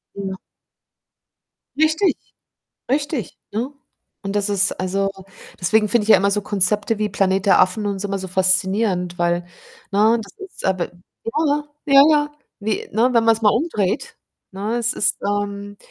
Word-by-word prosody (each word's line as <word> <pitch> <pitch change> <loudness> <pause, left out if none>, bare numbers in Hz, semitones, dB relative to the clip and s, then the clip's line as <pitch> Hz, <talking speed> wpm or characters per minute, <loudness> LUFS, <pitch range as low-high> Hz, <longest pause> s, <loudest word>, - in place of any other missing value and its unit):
Ja. 190 -1 -5 1.4
Richtig, 315 +5 +2 0.8
richtig, 285 - -2
ne? 235 +7 -3 0.5
Und 195 +1 -4
das 205 0 +1
ist 195 -1 +3
also, 195 +1 0 0.5
deswegen 210 +4 +2
finde 230 0 +2
ich 220 - -6
ja - - +8
immer 200 +1 +1
so 205 +1 0
Konzepte 205 +2 0
wie 210 -1 0
Planet 195 0 0
der 195 - +5
Affen 185 +3 +1
und 200 -1 -2
so 205 - -3
immer 195 0 -3
so 190 - -6
faszinierend, 190 0 +1
weil 175 0 0 0.5
ne 220 +3 +3
das 200 - -12
ist 390 -1 -8
aber, 185 -2 +1 0.4
ja, 300 +8 -1
ja, 295 0 +1 0.2
ja, 275 -1 +7
ja, 295 -1 +2 0.3
wie, 210 0 -3
ne, 230 +4 +3
wenn 230 -1 +4
man's 225 0 +3
mal 210 - +5
umdreht, 280 - -1 0.3
ne, 205 +5 -3
es 235 0 0
ist - - +1
ähm, 205 0 -3
205 Hz, 160 wpm, -20 LUFS, 195-230 Hz, 1.4 s, ja